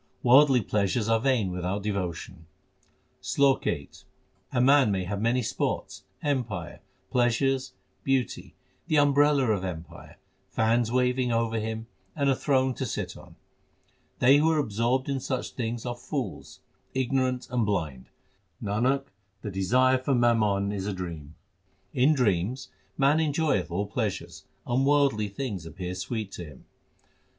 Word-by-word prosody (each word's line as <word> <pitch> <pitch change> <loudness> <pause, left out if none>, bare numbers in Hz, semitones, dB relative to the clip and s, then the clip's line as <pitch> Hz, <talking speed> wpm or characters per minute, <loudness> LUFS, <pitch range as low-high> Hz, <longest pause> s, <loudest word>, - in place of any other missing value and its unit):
Worldly 130 0 +6
pleasures 105 +2 0
are 115 0 +3
vain 120 -6 +1
without 90 +3 -3
devotion: 90 -5 -4 0.7
SLOK 140 -1 +2
VIII - - -2 0.6
A 125 - 0
man 135 -2 +5
may 95 -2 0
have 100 +2 -3
many 120 +2 +1
sports, - - -3 0.2
empire, 115 - -2 0.3
pleasures, 130 +2 +1 0.3
beauty, 135 -2 -1 0.3
the 155 -3 +2
umbrella 145 -3 +4
of 100 -3 0
empire, 85 -3 -8 0.3
fans 115 +2 +1
waving 125 0 +1
over 115 -1 0
him, 110 +1 -4 0.3
and 140 -3 +2
a - - +2
throne 130 -1 +1
to 130 - -4
sit - - -4
on - - -14 0.8
They 135 +3 +6
who 155 +2 +3
are 160 - +2
absorbed 120 0 0
in 140 -1 -1
such 130 0 -3
things 115 -1 -4
are 120 -1 -3
fools, 120 - -5 0.3
ignorant, 130 -1 0
and 125 -2 +1
blind; 80 -11 -2 0.5
Nanak, 125 +7 0 0.4
the 105 - -4
desire 125 +8 +3
for 130 +1 0
mammon 105 -5 +2
is 100 -1 -3
a 105 - -1
dream. 80 -5 -7 0.6
In 140 +5 +4
dreams 115 +1 0 0.3
man 140 +3 +4
enjoyeth 145 - +1
all 95 +4 -1
pleasures, 95 -7 -4 0.2
and 125 +2 +1
worldly 140 -7 +3
things 100 -6 -5
appear 90 +2 -5
sweet 100 +2 -4
to 90 - -7
him. 75 -4 -14
120 Hz, 140 wpm, -27 LUFS, 100-130 Hz, 0.8 s, Worldly